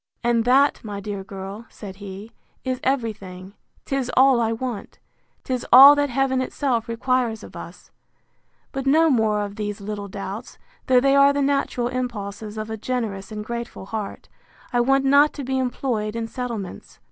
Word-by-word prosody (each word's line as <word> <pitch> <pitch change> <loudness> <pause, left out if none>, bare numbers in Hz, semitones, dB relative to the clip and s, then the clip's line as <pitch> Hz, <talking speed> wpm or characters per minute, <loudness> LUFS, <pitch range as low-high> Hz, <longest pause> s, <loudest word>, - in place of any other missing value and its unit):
And 235 -1 +2
that, 270 +3 +3
my 205 -2 -5
dear 200 -1 -5
girl, 195 +3 -8
said 195 -3 -10
he, 200 +2 -9 0.3
is 255 -1 -2
every 250 -5 0
thing: 185 -1 -11 0.3
'Tis 270 -2 -2
all 260 -2 +6
I 225 -1 +1
want: 230 -1 -5 0.5
'Tis 255 -2 -2
all 270 +4 +11
that 290 0 +1
Heaven 265 +1 +1
itself 255 -3 -1
requires 230 -1 0
of - - -12
us: - - -10 0.8
But 270 -1 -4
no 320 +3 +5
more 220 -4 +2
of 205 0 -5
these 205 0 -4
little 205 0 -5
doubts, 200 +3 -7 0.3
though 255 -1 +6
they 275 +1 +4
are 280 0 +6
the 285 0 0
natural 275 -3 0
impulses 220 -4 -5
of 215 +1 -5
a 220 - -3
generous 220 -4 -3
and 210 -1 -5
grateful 235 -4 -6
heart: 210 0 -6 0.5
I 245 - +3
want 270 +2 +2
not 285 +2 +5
to 285 - -6
be 265 +1 -1
employed 240 -4 -2
in 230 -1 -2
settlements. 230 -6 -6
235 Hz, 170 wpm, -23 LUFS, 210-260 Hz, 0.8 s, all